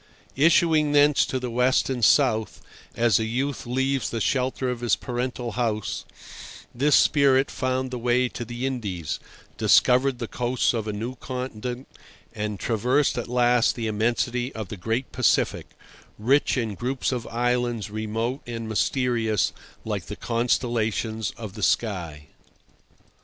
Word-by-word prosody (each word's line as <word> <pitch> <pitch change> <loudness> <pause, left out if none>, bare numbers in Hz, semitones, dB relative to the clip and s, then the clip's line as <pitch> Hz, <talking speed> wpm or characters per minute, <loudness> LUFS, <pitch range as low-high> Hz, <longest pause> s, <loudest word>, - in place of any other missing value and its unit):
Issuing 155 0 +4
thence 145 0 +4
to 130 - -2
the 125 -1 -4
west 125 +2 +2
and 125 -3 -3
south, 110 -4 +3 0.4
as 115 -3 +3
a - - 0
youth 130 +3 -2
leaves 130 +1 0
the 115 - -3
shelter 130 +3 0
of 125 - -4
his 120 -1 +2
parental 125 -1 -4
house, 110 -5 -2 0.7
this 140 +4 +3
spirit 140 -2 +4
found 130 0 -2
the 125 - -4
way 125 +1 +2
to 120 - -6
the 120 +2 -5
Indies, 100 - -3 0.4
discovered 130 +1 +4
the 120 - -4
coasts 125 +2 0
of 110 -2 -3
a - - -1
new 115 +5 -5
continent, 125 0 -5 0.5
and 105 -2 -4
traversed 125 +5 +1
at 120 - -3
last 120 -1 +3
the 115 - -4
immensity 120 +3 0
of 110 -4 -5
the - - -5
great 115 +7 -2
Pacific, - - +1 0.5
rich 135 +6 +2
in 115 -4 -1
groups 125 +6 -2
of 120 -3 -3
islands 120 -3 -1
remote 110 +5 -3
and 115 -1 -5
mysterious 110 -2 0 0.3
like - - -3
the - - -6
constellations 115 -2 -1
of 110 -4 -7
the 105 - -8
sky. 85 -9 -1
120 Hz, 145 wpm, -25 LUFS, 110-130 Hz, 0.7 s, Issuing